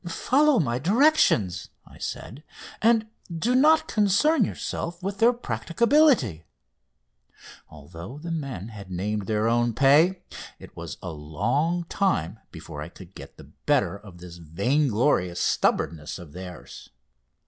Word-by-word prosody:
"Follow 280 Hz, -, +2 dB
my 125 Hz, -7 st, 0 dB
directions," 185 Hz, -, +2 dB, 0.2 s
I -, -, -17 dB
said, 125 Hz, -, -6 dB, 0.4 s
"and 225 Hz, 0 st, +3 dB, 0.3 s
do 190 Hz, +9 st, -1 dB
not 315 Hz, +4 st, +4 dB
concern 220 Hz, -, +2 dB
yourselves 170 Hz, -1 st, -5 dB
with 195 Hz, +1 st, -4 dB
their 235 Hz, +2 st, +5 dB
practicability!" 235 Hz, -, +1 dB, 1.3 s
Although 85 Hz, -, -11 dB
the 170 Hz, +3 st, -7 dB
men 135 Hz, -, -5 dB
had 100 Hz, -4 st, -11 dB
named 100 Hz, +2 st, -3 dB
their 110 Hz, 0 st, 0 dB
own 120 Hz, 0 st, +1 dB
pay, 150 Hz, +8 st, +4 dB, 0.3 s
it -, -, -14 dB
was -, -, -7 dB
a 90 Hz, -, -5 dB
long 120 Hz, -, -1 dB
time 115 Hz, -, -1 dB
before 80 Hz, -3 st, -9 dB
I 75 Hz, -, -7 dB
could 90 Hz, +1 st, -15 dB
get -, -, -12 dB
the -, -, -15 dB, 0.2 s
better -, -, +2 dB
of 100 Hz, -3 st, -13 dB
this 85 Hz, -1 st, -11 dB
vainglorious 100 Hz, -, 0 dB
stubbornness 75 Hz, -3 st, 0 dB
of 85 Hz, -5 st, -12 dB
theirs. 90 Hz, -2 st, -10 dB
120 Hz, 130 wpm, -25 LUFS, -, 1.3 s, their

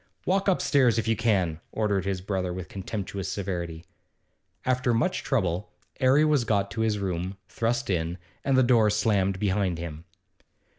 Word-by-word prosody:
'Walk 195 Hz, +2 st, +1 dB
upstairs, 140 Hz, -, +3 dB
if 115 Hz, -1 st, 0 dB
you 115 Hz, -, +3 dB
can!' 95 Hz, -8 st, +1 dB
ordered 100 Hz, -4 st, 0 dB
his 95 Hz, -2 st, -2 dB
brother 95 Hz, -2 st, -2 dB
with 90 Hz, 0 st, -6 dB
contemptuous 95 Hz, -1 st, -4 dB
severity. 85 Hz, -4 st, -4 dB, 0.8 s
After 125 Hz, -2 st, +2 dB
much 125 Hz, +11 st, +1 dB
trouble 95 Hz, -, -1 dB, 0.3 s
'Arry 135 Hz, +3 st, +5 dB
was 150 Hz, -4 st, +3 dB
got 100 Hz, -3 st, 0 dB
to 110 Hz, -, -3 dB
his 110 Hz, -2 st, +1 dB
room, 95 Hz, -1 st, -3 dB
thrust 120 Hz, +2 st, -1 dB
in, 85 Hz, -2 st, -1 dB, 0.3 s
and 135 Hz, -1 st, +2 dB
the 130 Hz, -, +6 dB
door 120 Hz, -3 st, +4 dB
slammed 100 Hz, -3 st, +1 dB
behind 95 Hz, -3 st, 0 dB
him. 85 Hz, -1 st, -7 dB
100 Hz, 155 wpm, -27 LUFS, 90-120 Hz, 0.8 s, the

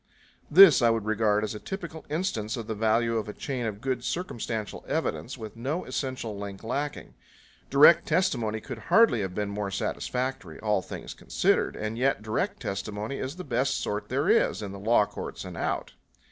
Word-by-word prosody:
This 175 Hz, -3 st, +9 dB
I 120 Hz, -, +5 dB
would 115 Hz, -2 st, 0 dB
regard 110 Hz, -1 st, +2 dB
as 110 Hz, -, -2 dB
a 105 Hz, -, -6 dB
typical 170 Hz, -, -7 dB
instance 145 Hz, -, -2 dB
of 115 Hz, -, -5 dB
the 110 Hz, -, -3 dB
value 115 Hz, +2 st, +2 dB
of 105 Hz, -, -5 dB
a -, -, -5 dB
chain 130 Hz, -8 st, -3 dB
of 105 Hz, -1 st, -5 dB
good 130 Hz, -1 st, -2 dB
circumstantial 115 Hz, -, -4 dB
evidence, -, -, -2 dB
with 110 Hz, -1 st, -8 dB
no 135 Hz, +9 st, -3 dB
essential 130 Hz, -4 st, -3 dB
link 100 Hz, 0 st, -7 dB
lacking. 140 Hz, +5 st, -3 dB, 0.6 s
Direct 150 Hz, +4 st, +7 dB
testimony 125 Hz, -, +1 dB
could 130 Hz, -2 st, -7 dB
hardly 225 Hz, -, +5 dB
have 95 Hz, -2 st, -4 dB
been 105 Hz, -1 st, -1 dB
more 100 Hz, -1 st, -3 dB
satisfactory, 125 Hz, -3 st, -3 dB
all 105 Hz, -3 st, +1 dB
things -, -, -7 dB
considered; -, -, +1 dB
and 110 Hz, +2 st, -4 dB
yet 130 Hz, -4 st, +1 dB
direct 110 Hz, 0 st, -2 dB
testimony 105 Hz, +5 st, -4 dB
is 130 Hz, +4 st, -4 dB
the 185 Hz, -, -7 dB
best 130 Hz, -1 st, 0 dB
sort 105 Hz, 0 st, -3 dB
there -, -, 0 dB
is, -, -, +3 dB
in 100 Hz, -, -5 dB
the 100 Hz, -, -8 dB
law 105 Hz, +1 st, +4 dB
courts -, -, -7 dB
and -, -, -7 dB
out. -, -, -2 dB
115 Hz, 185 wpm, -27 LUFS, 105-135 Hz, 0.6 s, This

